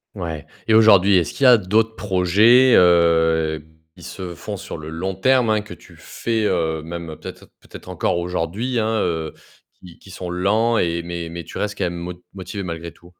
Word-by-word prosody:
Ouais. 80 -6 -6 0.2
Et 110 - +4
aujourd'hui, 100 -3 +6
est-ce 85 - -1
qu'il 140 - -4
y - - +8
a 125 -2 +8
d'autres 110 +3 0
projets, 105 +7 +4
heu, 80 -3 +3 0.3
qui - - -15
se 90 -2 -7
font - - -7
sur - - -8
le 80 0 -9
long 90 +4 -4
terme, 125 +3 +2
hein, 110 -1 +2
que 105 - -11
tu - - -17
fais, 110 -2 -3
heu, 80 -4 -1
même 85 -1 -7
peut-être - - -11
peut-être - - -13
encore 85 - -1
aujourd'hui, 90 +8 -3
hein, 110 - 0
heu, 80 -2 -2 0.5
qui 90 -2 -15
qui 100 - -16
sont 90 -1 -7
lents 110 +6 +1
et 85 0 0
mais 85 -1 -6
mais 85 0 -7
tu - - -10
restes 105 -1 -3
quand 95 - -2
même 85 0 -3
mo 85 +1 -6 0.2
motivée 95 +2 -7
malgré 85 -1 -6
tout? 85 +1 -20
90 Hz, 200 wpm, -20 LUFS, 85-105 Hz, 0.5 s, y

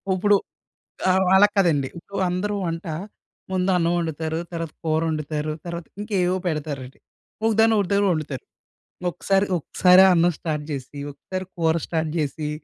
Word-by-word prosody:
ఇప్పుడు 205 +2 +4 0.7
ఆ! - - +6 0.2
అలా 205 +2 +7
కాదండి. 160 -9 +3
ఇప్పుడు 200 +4 -8
అందరూ 205 +4 -1
వంట, 165 +2 -3 0.7
ముందు 185 0 +1
అన్నం 170 0 +2
వండుతారు. 160 -1 -2
తర్వాత 165 -2 -4
కూరొండుతారు. 155 -1 -1
తర్వాత 170 -1 -5
ఇంకేవో 190 -4 0
పెడతారండి. 145 -5 -4 0.5
ఒకదాన్ని 225 0 +4
ఒకదాన్ని 200 +1 +2
వండుతారు. 150 -5 -3 0.6
ఒక్కసారి 195 +3 +1
ఒక్కసారే 180 +3 +5
అన్నం 175 0 +4
స్టార్ట్ 150 -3 -3
జేసి, 140 +1 -6
ఒక్కసారి 185 +6 -6
కూర 165 -1 +2
స్టార్ట్ 160 -2 -1
జేసి 150 0 -2
165 Hz, 130 wpm, -23 LUFS, 155-185 Hz, 0.7 s, అలా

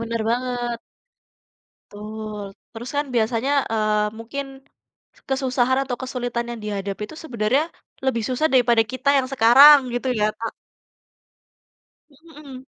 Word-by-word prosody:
Benar 230 0 -3
banget. 240 -1 -2 1.1
Betul, 210 0 -7 0.3
terus 240 +3 -8
kan 290 - 0
biasanya, 230 +3 0 0.2
eee, 215 -1 +1
mungkin, 260 +5 -5 0.8
kesusahan 260 -1 +1
atau 250 -2 -4
kesulitan 245 -2 -3
yang 235 -2 -6
dihadapi 200 -1 -4
itu 315 - -11
sebenarnya, 240 +2 0 0.4
lebih 235 -4 0
susah 260 +5 +1
daripada 240 -3 +4
kita 260 +2 -2
yang 260 -1 -1
sekarang, 270 +5 +8 0.2
gitu 245 +2 -2
ya, 210 - +3
Kak. 230 0 -4 1.6
Mhm. 285 -3 -13
245 Hz, 115 wpm, -22 LUFS, 225-265 Hz, 1.6 s, sekarang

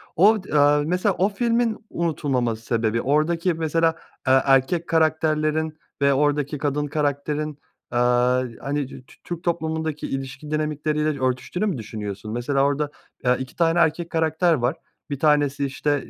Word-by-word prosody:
O 205 +3 +5
d - - -9
aaa, 145 +1 +5
mesela 180 +4 +1
o 195 +3 +3
filmin 230 +1 0
unutulmama 135 -8 -1
sebebi 115 0 -1
oradaki 165 +5 +1
mesela, 165 +1 +1 0.3
eee, 130 0 +6
erkek 135 +6 +3
karakterlerin 155 -1 +1 0.2
ve 140 0 +4
oradaki 145 +1 +1
kadın 145 +1 -1
karakterin, 145 0 -2 0.3
aaa, 125 +1 +3 0.2
hani, 140 0 -2
dü 130 -2 -11
Tü - - -18
Türk 175 0 -6
toplumundaki 160 -2 -2
ilişki 135 +2 -5
dinamikleriyle 150 -1 -1
örtüştüğünü 130 +10 -1
mü 190 -9 -1
düşünüyorsun? 105 -2 -6
Mesela 135 +3 +1
orada, 145 +1 0 0.3
eee, 125 0 +4
2 130 -1 -7
tane 165 0 +2
erkek 165 +1 +1
karakter 160 +1 +2
var. 125 +1 0 0.3
Bir 140 - -4
tanesi, 145 -2 +2
işte, 145 +1 -1
150 Hz, 145 wpm, -23 LUFS, 135-160 Hz, 0.3 s, eee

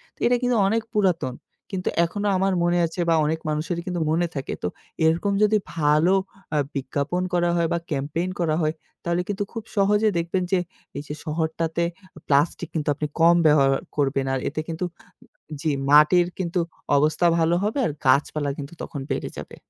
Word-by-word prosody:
তো - - -33
এটা 245 +1 +3
কিন্তু 245 -1 +1
অনেক 225 +3 +1
পুরাতন 175 -11 +1 0.4
কিন্তু 185 -2 -2 0.2
এখনো 205 +5 -3
আমার 190 +1 +1
মনে 175 0 +2
আছে 165 +2 -7
বা 165 - +5
অনেক 160 +2 0
মানুষেরই 165 +3 -2
কিন্তু 180 -2 -2
মনে 170 +2 +2
থাকে। 135 - -3
তো - - +1 0.4
এরকম 165 +5 +2
যদি 210 0 +4 0.2
ভালো 155 +4 +4 0.4
আ - - +3 0.2
বিজ্ঞাপন 140 +6 -2
করা 175 -1 +2
হয় 170 -1 +2
বা - - +1
ক্যাম্পেইন 150 +5 -1
করা 160 -3 +1
হয় 155 0 +1 0.3
তাহলে 170 +1 0
কিন্তু 205 0 -1
খুব 225 -2 -5
সহজে 205 +2 +4
দেখবেন 170 +2 0
যে 190 - +4 0.4
এই 140 - -4
যে - - -4
শহরটাতে 160 +1 -1 0.4
প্লাস্টিক 145 +4 +2
কিন্তু 155 -3 -2
আপনি 150 +1 -2
কম 170 +1 +6
ব্যবহার 145 -3 +5 0.3
করবেন। 135 -1 +1
আর 135 - 0
এতে 155 +2 -3
কিন্তু 165 +2 -3 0.8
যে 155 -1 +1 0.2
মাটির 150 +4 +6
কিন্তু 180 -1 -1 0.4
অবস্থা 155 +4 +2
ভালো 165 +1 +3
হবে 215 +7 0
আর - - 0
গাছপালা 145 +2 +2
কিন্তু 145 +2 -7
তখন 145 - -6
বেড়ে - - -2
যাবে। - - -8
165 Hz, 175 wpm, -24 LUFS, 150-180 Hz, 0.8 s, কম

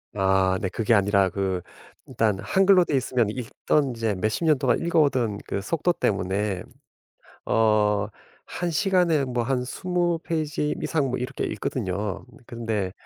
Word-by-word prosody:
아 95 -1 +2
네 95 - -1
그게 115 +3 +1
아니라 100 -2 +3
그 95 -1 -2 0.4
일단 105 -3 0
한글로 190 - +4
되어 145 - +1
있으면 125 -3 0
읽던 130 +4 -1
이제 115 -2 -1
몇십 110 - -1
년 150 -4 +4
동안 125 -3 +2
읽어 170 0 +1
오던 120 -8 +1
그 100 - -2
속도 165 - 0
때문에 100 - -1 0.8
어 105 -2 +2 0.4
1시간에 175 -3 +1
뭐 125 -2 -1
한 125 +1 0
20페이지 165 -1 -1
이상 155 -4 0
뭐 125 - -2
이렇게 125 +3 -3
읽거든요. 100 -3 -3 0.2
근데 110 -5 -3
115 Hz, 265 characters per minute, -25 LUFS, 100-150 Hz, 0.8 s, 한글로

